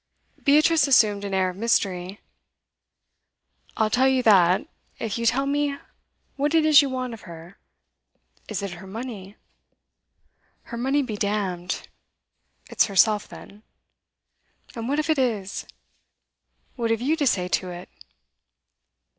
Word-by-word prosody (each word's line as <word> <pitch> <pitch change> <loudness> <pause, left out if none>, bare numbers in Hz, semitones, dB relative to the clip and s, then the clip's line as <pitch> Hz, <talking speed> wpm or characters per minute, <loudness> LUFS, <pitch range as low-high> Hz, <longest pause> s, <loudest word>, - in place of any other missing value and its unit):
Beatrice 305 +2 +4
assumed 215 -6 +4
an 195 -1 -3
air 185 -1 +1
of - - -14
mystery. 195 -4 -1 1.6
'I'll 220 -1 +1
tell 260 +2 +3
you 260 -1 +2
that, 185 -5 +4 0.3
if 225 0 -4
you 230 - 0
tell 270 +3 +2
me 285 0 -1 0.6
what 290 +3 0
it 320 -1 +4
is 305 -2 +7
you 280 - -2
want 255 -2 -4
of 220 -5 -11
her. 170 +3 -12 0.9
Is 200 -3 -4
it 200 - -4
her 175 +2 -10
money?' 210 -2 -8 1.3
'Her 235 - -8
money 270 +3 +1
be 220 -5 -5
damned!' 195 -4 -2 0.8
'It's - - +2
herself, 210 +1 +3
then.' 205 +1 -13 1.1
'And 230 +1 -5
what 285 - 0
if 305 0 -1
it 315 -3 +1
is? 215 -7 -2 1.1
What 235 -2 -2
have 225 -1 +1
you 290 +6 +1
to 285 - +1
say 180 -6 +1
to 180 +1 -1
it? 175 +1 -9
225 Hz, 140 wpm, -24 LUFS, 195-265 Hz, 1.6 s, is